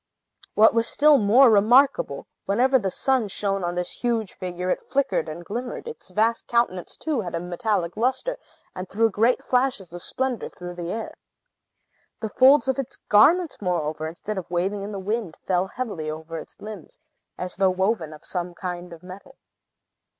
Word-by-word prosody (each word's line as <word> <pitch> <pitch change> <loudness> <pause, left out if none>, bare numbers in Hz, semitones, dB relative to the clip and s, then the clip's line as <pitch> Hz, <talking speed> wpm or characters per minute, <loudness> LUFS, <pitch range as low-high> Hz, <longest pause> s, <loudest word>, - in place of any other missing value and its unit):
What 220 +1 +6
was 230 0 +2
still 295 +1 +5
more 235 +5 +6
remarkable, 250 - +4 0.2
whenever 255 +6 +3
the 195 -4 -1
sun 255 +3 +1
shone 195 -1 0
on 175 0 -2
this 180 0 -3
huge 230 -4 -1
figure, 180 -1 -4
it - - -3
flickered 270 - 0
and 170 +3 -8
glimmered; 245 - -5
its 465 - -9
vast 220 +5 0
countenance, 235 -7 0
too, 300 -7 -1
had 175 -4 -5
a - - -1
metallic 180 0 -2
lustre, 260 - -1 0.4
and 185 0 -6
threw 225 +2 +2
great 230 +5 +2
flashes 250 -9 0
of 175 - -7
splendor 260 +3 -2
through 175 0 -8
the 175 0 -5
air. 225 0 -4 1.1
The 220 - -3
folds 265 +6 +5
of 265 +1 0
its 270 0 -4
garments, 315 - +3
moreover, 155 -4 -1
instead 190 +5 -5
of 180 - -10
waving 190 +4 -1
in 200 +1 -5
the 200 - -5
wind, 200 -2 -3
fell 185 0 +1
heavily 195 -9 -4
over 160 +1 -6
its - - -12
limbs, 215 - -10 0.4
as 180 +1 -6
if 190 -1 +3
woven 190 -5 0
of 155 - -13
some 175 -1 -3
kind 180 -1 -6
of 165 +1 -13
metal. 200 +9 -12
205 Hz, 175 wpm, -24 LUFS, 180-245 Hz, 1.1 s, What